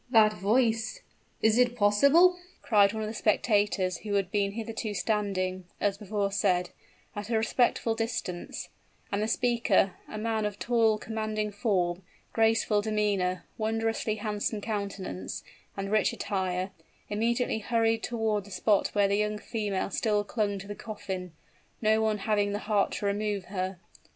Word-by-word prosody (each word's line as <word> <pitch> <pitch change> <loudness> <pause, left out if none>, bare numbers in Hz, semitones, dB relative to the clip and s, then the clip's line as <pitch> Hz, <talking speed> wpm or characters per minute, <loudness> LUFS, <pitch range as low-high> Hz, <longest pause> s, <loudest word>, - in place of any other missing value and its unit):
"That 220 -3 +6
voice! 225 - +1 0.4
is 220 +2 +4
it 245 -1 +3
possible?" 280 - +5 0.2
cried 205 -3 +5
one 220 0 -3
of - - -2
the 215 - -4
spectators 205 -4 +1
who 205 -2 -3
had 195 -2 0
been 200 -1 +1
hitherto 220 -1 -4
standing, 185 -2 -1
as 200 -1 0
before 205 -1 -1
said, 180 -3 +1 0.4
at 205 +1 -5
a 230 - +2
respectful 225 +1 +2
distance: 225 -6 -4 0.4
and 200 - 0
the 215 - 0
speaker 230 -5 +2
a 215 - -7
man 220 0 -1
of 205 -1 -6
tall, 225 -2 +2
commanding 215 -1 -3
form, 190 -4 0 0.3
graceful 225 -2 +3
demeanor, 205 -4 0
wondrously 225 0 0
handsome 210 0 -2
countenance, 200 - -4 0.3
and 195 0 -3
rich 215 -2 +3
attire 185 -1 -2 0.4
immediately 230 +2 +1
hurried 225 0 +1
toward 220 -4 -1
the - - -12
spot 200 +2 +2
where 205 -1 +4
the 200 +1 +1
young 210 0 0
female 210 -3 -2
still 210 -2 +1
clung 205 -1 -1
to 195 +1 -8
the 205 - -4
coffin, 190 -4 -6 0.5
no 220 0 +3
one 220 -1 +1
having 205 -1 +1
the - - 0
heart 205 -2 +2
to - - -3
remove 200 -1 -1
her. 185 0 -2
210 Hz, 150 wpm, -29 LUFS, 200-225 Hz, 0.5 s, That